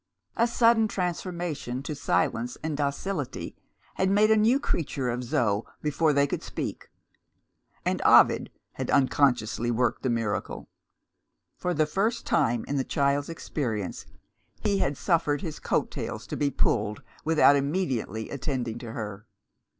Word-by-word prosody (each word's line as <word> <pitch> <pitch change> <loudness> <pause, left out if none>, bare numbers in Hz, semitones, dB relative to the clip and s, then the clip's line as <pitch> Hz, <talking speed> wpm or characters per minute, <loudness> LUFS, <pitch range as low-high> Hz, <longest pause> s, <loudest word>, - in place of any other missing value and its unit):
A 235 - +3
sudden 230 -1 +4
transformation 175 -8 -3
to 150 - -4
silence 125 -3 0
and 155 -1 -2
docility 145 0 -3 0.4
had 190 - +2
made 210 +2 +4
a - - +7
new 225 +5 +4
creature 135 - -1
of 125 +1 -3
Zo, 110 -3 +1 0.2
before 150 +1 +2
they 140 0 +3
could - - -3
speak - - -5 1.0
and - - 0
Ovid - - +6 0.2
had - - -4
unconsciously 125 -4 +2
worked 120 +1 +1
the 130 - 0
miracle. 115 -3 -2 0.9
For 180 0 -2
the 155 +1 +3
first 215 +9 -1
time 115 -1 +1
in 145 - -1
the 135 - +1
child's 140 +1 0
experience, 120 - -4 0.5
he 200 -1 +1
had 140 -4 0
suffered 160 -4 +1
his 165 -6 -5
coat - - 0
tails - - -5
to - - -5
be 145 - +1
pulled 105 -5 0 0.2
without 155 -2 +5
immediately 135 - -1
attending 125 -4 -3
to 115 -2 -7
her. 105 -1 -6
140 Hz, 140 wpm, -27 LUFS, 120-175 Hz, 1.0 s, a